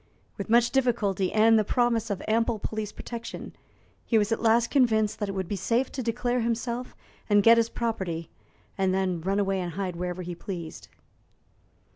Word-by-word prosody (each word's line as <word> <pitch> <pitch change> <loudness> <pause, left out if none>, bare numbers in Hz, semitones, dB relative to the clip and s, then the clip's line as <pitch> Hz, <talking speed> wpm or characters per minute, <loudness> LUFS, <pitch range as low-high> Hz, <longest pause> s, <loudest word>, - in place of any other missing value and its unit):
With 200 - -6
much 235 +1 +4
difficulty, 215 -8 +1
and 220 +1 +5
the - - +2
promise 235 0 +1
of 200 - -3
ample 230 +1 +1
police 215 0 -4
protection, 235 -1 -8 0.5
he 230 - +2
was 210 +1 +1
at 225 - 0
last 230 +1 +3
convinced 220 -6 +2
that 205 - -2
it - - -3
would 190 -2 -3
be 205 - -2
safe 230 +7 0
to 265 - -4
declare 245 +1 -1
himself 235 +1 -2 0.3
and 205 -1 +5
get 230 +2 +7
his 230 0 +2
property, 190 -10 -3 0.5
and 190 -1 +2
then 185 -3 -1
run 195 +4 0
away 195 -1 0
and 175 -2 -4
hide 185 -2 -3
wherever 180 +1 -4
he 175 0 -5
pleased. 170 -2 -7
215 Hz, 180 wpm, -27 LUFS, 190-235 Hz, 0.5 s, get